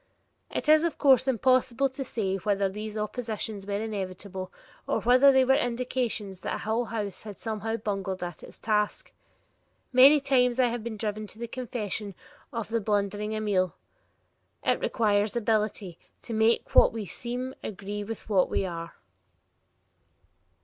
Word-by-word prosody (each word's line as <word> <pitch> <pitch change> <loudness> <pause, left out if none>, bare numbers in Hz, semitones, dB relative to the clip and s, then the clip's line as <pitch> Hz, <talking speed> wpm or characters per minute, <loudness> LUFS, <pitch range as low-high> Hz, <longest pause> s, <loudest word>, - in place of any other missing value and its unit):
It - - -3
is, 310 +1 +6
of 335 - -1
course 265 -2 +5
impossible 255 +1 +3
to 265 +1 -5
say 200 -6 -2
whether 200 0 +1
these 210 +2 -6
oppositions 215 -2 -4
were 200 0 -1
inevitable 190 -3 -5 0.4
or - - +1
whether 255 +4 +6
they 265 -1 +4
were 265 - +5
indications 245 -6 -1
that - - -4
Hull 225 +3 0
House 210 -4 -4
had 210 -2 -9
somehow 225 0 -3
bungled 195 -3 -3
at 175 -2 -6
its - - -12
task. 210 -1 -1 0.8
Many 270 +4 +8
times 255 -3 +2
I 250 -1 +4
have 235 -1 -4
been 230 -2 -5
driven 215 0 -3
to 215 - -7
the 235 +1 -5
confession 220 -5 -4 0.4
of 230 -4 -4
the 230 0 0
blundering 205 +1 -1
Amiel: 200 -4 0 0.9
"It - - +2
requires 210 -2 +1
ability 210 -5 -1 0.2
to 230 - -6
make 220 +1 +2
what - - +7
we 220 -2 -5
seem 245 +7 -4
agree 205 0 -5
with 225 +1 -7
what 195 -4 +3
we - - 0
are." 170 -2 -6
220 Hz, 150 wpm, -27 LUFS, 200-245 Hz, 0.9 s, Many